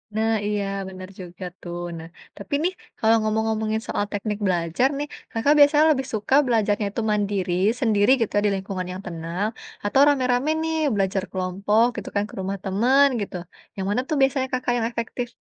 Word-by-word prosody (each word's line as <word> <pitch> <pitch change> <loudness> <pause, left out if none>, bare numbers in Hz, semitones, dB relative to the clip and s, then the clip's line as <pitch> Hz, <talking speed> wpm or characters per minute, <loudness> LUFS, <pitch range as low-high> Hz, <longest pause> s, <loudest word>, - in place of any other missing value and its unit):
Nah, 220 +1 +1
iya, 205 -1 0 0.3
bener 185 0 -9
juga 180 0 -8 0.2
tuh. 175 0 -6 0.2
Nah, 160 0 -8 0.3
tapi 200 +6 -8
nih 365 +2 +1 0.2
kalau 225 0 +4
ngomong-ngomongin 220 0 0
soal 205 - -1
teknik 210 0 -2
belajar 175 +6 +1
nih, 295 +1 -3 0.2
Kakak 245 +6 +3
biasanya 295 +1 +6
lebih 265 -3 0
suka 215 +4 +1
belajarnya 215 -3 +1
itu 230 - -3
mandiri, 200 -3 0 0.3
sendiri 215 -5 +2
gitu 225 - -1
di - - +4
lingkungan 190 -1 -4
yang 185 - -7
tenang, 170 +4 -3 0.4
atau 205 +7 +3
rame-rame 255 -1 +2
nih 320 0 -1 0.2
belajar 195 -1 0
kelompok 195 +4 +1
gitu - - -5
kan 200 - +2
ke - - -15
rumah 195 +1 -3
teman 245 +9 +4
gitu. 200 - -5 0.4
Yang 190 - -2
mana 220 +5 +1
tuh 310 - +1
biasanya 270 -1 +2
Kakak 250 -1 0
yang 225 -1 0
efektif? 235 +1 -4
210 Hz, 175 wpm, -23 LUFS, 190-245 Hz, 0.4 s, biasanya